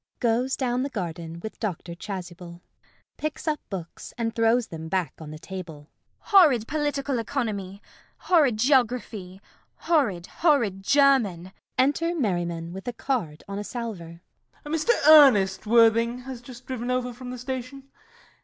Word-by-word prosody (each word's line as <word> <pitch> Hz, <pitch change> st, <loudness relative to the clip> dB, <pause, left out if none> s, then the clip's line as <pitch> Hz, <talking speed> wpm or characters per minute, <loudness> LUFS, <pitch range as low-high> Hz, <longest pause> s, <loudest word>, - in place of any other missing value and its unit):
[Goes 245 Hz, +2 st, +1 dB
down 250 Hz, -1 st, 0 dB
the 275 Hz, -, -2 dB
garden 170 Hz, -, -5 dB
with 220 Hz, -, -8 dB
Dr. 180 Hz, -5 st, -4 dB
Chasuble.] 180 Hz, -2 st, -7 dB
CECILY. 175 Hz, -, -19 dB, 0.6 s
[Picks 310 Hz, +1 st, -5 dB
up 300 Hz, -2 st, 0 dB
books 175 Hz, -4 st, -8 dB
and 225 Hz, -1 st, -2 dB
throws 230 Hz, +1 st, +2 dB
them 160 Hz, -1 st, -7 dB
back 185 Hz, -2 st, -1 dB
on 160 Hz, -2 st, -9 dB
table.] 160 Hz, -4 st, -9 dB, 0.3 s
Horrid 295 Hz, -, +4 dB
Political 290 Hz, -3 st, -1 dB
Economy! 210 Hz, -6 st, -4 dB, 0.3 s
Horrid 295 Hz, -11 st, +3 dB
Geography! 230 Hz, -7 st, 0 dB, 0.4 s
Horrid, 235 Hz, -, 0 dB
horrid 235 Hz, -, +1 dB
German! 215 Hz, -8 st, +3 dB, 0.3 s
[Enter 310 Hz, +6 st, +2 dB
Merriman 175 Hz, -, -2 dB
with 190 Hz, +4 st, -9 dB
a 245 Hz, -, -2 dB
card 200 Hz, -, -3 dB
on 200 Hz, 0 st, -5 dB
a -, -, -4 dB
salver.] 195 Hz, -9 st, -7 dB, 0.4 s
MERRIMAN. 315 Hz, +2 st, -1 dB
Mr. 440 Hz, -3 st, +2 dB
Ernest 235 Hz, -11 st, +6 dB
Worthing 230 Hz, +2 st, +4 dB
has 250 Hz, -1 st, -8 dB
just 245 Hz, 0 st, -12 dB
driven 250 Hz, -2 st, -4 dB
over 250 Hz, -1 st, -1 dB
from 250 Hz, +1 st, -9 dB
the 250 Hz, -, -6 dB
station. 260 Hz, +2 st, -6 dB
230 Hz, 145 wpm, -25 LUFS, 185-265 Hz, 0.6 s, Ernest